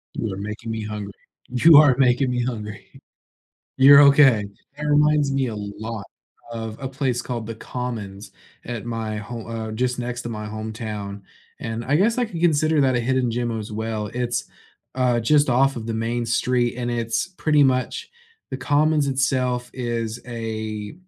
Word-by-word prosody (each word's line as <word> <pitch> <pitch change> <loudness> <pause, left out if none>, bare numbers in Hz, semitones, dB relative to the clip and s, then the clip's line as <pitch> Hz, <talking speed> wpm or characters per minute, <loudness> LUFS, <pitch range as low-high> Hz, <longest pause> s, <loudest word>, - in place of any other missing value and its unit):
You 110 -3 -2
are 95 - -6
making 105 +3 -6
me 110 -1 -3
hungry. 105 -2 -6 0.4
You 145 +6 +6
are 145 -4 +7
making 125 0 +3
me 125 -1 0
hungry. 105 -4 -6 0.8
You're 140 +2 +9
okay. 140 -6 +6 0.3
That 150 - -4
reminds 150 -1 +3
me 135 -2 0
a 110 - -5
lot 105 +1 -6 0.5
of 110 -1 -5
a 135 - -4
place 130 -3 -1
called 120 -4 -4
The 115 - -5
Commons 110 -5 -6 0.3
at 120 -2 -5
my 115 -2 -3
ho 115 +3 -6
uh, 115 -1 -5
just 125 +2 -1
next 120 0 -4
to 120 - -5
my 105 -2 -5
hometown, 110 -2 -6 0.4
and 115 +1 -4
I 145 +3 +3
guess 225 +7 +2
I 245 - +2
can 175 -6 -7
consider 155 -2 +3
that 130 -1 +2
a 120 - +1
hidden 125 0 0
gem 120 -1 -2
as 110 0 -7
well. 110 -1 -3
It's, 120 +2 -2 0.5
uh, 125 -2 +2
just 145 +4 +3
off 135 +2 +3
of 110 - -5
the 115 - -2
main 115 +1 -2
street, 120 +1 +1
and 120 -1 -2
it's 115 +2 -1
pretty 150 -2 +3
much 135 - 0 0.4
The 130 - -4
Commons 145 +2 +2
itself 125 -2 0
is 120 -2 -3
a 110 -3 -5
120 Hz, 175 wpm, -23 LUFS, 110-130 Hz, 0.8 s, You're